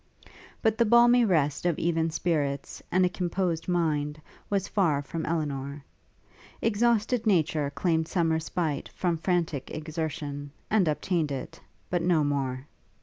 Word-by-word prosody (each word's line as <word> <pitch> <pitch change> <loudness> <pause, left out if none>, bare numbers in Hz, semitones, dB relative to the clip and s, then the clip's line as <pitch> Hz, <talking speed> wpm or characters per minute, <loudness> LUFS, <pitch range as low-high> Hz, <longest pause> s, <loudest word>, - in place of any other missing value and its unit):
But 220 0 +2
the 235 - +5
balmy 240 +2 +6
rest 150 -7 +1
of 175 -3 +1
even 165 -1 +1
spirits, 150 -4 -2
and 185 0 +4
a - - +4
composed 175 -2 -2
mind, 155 -4 0 0.3
was 200 -2 0
far 160 -8 +1
from 160 +3 -4
Elinor; 140 -3 -3 0.7
exhausted 230 +1 +1
nature 155 -6 +2
claimed 160 +3 0
some 165 -3 +1
respite 160 -1 -2
from 175 -3 0
frantic 170 -5 -1
exertion, 150 -2 -4 0.2
and 200 -5 +4
obtained 155 0 0
it; 135 -2 -6 0.3
but 175 -1 +1
no 165 -3 +3
more. 135 -2 -1
165 Hz, 135 wpm, -27 LUFS, 145-185 Hz, 0.7 s, balmy